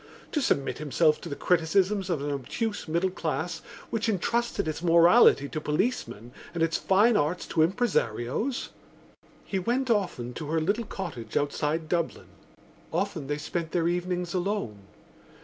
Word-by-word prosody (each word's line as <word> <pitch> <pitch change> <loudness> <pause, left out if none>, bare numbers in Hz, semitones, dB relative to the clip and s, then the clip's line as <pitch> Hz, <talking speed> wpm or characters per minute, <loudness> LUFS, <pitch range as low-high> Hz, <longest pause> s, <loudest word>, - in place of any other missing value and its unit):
To 300 - 0
submit 140 - 0
himself 155 +1 +2
to 170 - -7
the 140 - -4
criticisms 185 +4 +1
of 165 -6 0
an 145 - -2
obtuse 200 - -3
middle 170 +4 +1
class 170 -1 -3 0.3
which 225 0 0
entrusted 235 0 0
its 155 0 -3
morality 170 - +6
to 155 - -4
policemen 150 - -2 0.2
and 165 - +1
its 165 0 +1
fine 210 +5 +4
arts 165 +1 0
to 160 - +2
impresarios? 185 - 0 0.8
He 195 - -2
went 245 +6 0
often 175 - -1
to 150 +4 -6
her 160 +2 +1
little 200 +8 0
cottage 140 - -5
outside 150 +2 -1
Dublin; 170 0 -2 0.6
often 135 - -2
they 145 +1 -1
spent 165 +2 -4
their 170 -2 +2
evenings 180 0 -1
alone. 185 - -2
170 Hz, 150 wpm, -27 LUFS, 150-200 Hz, 0.8 s, morality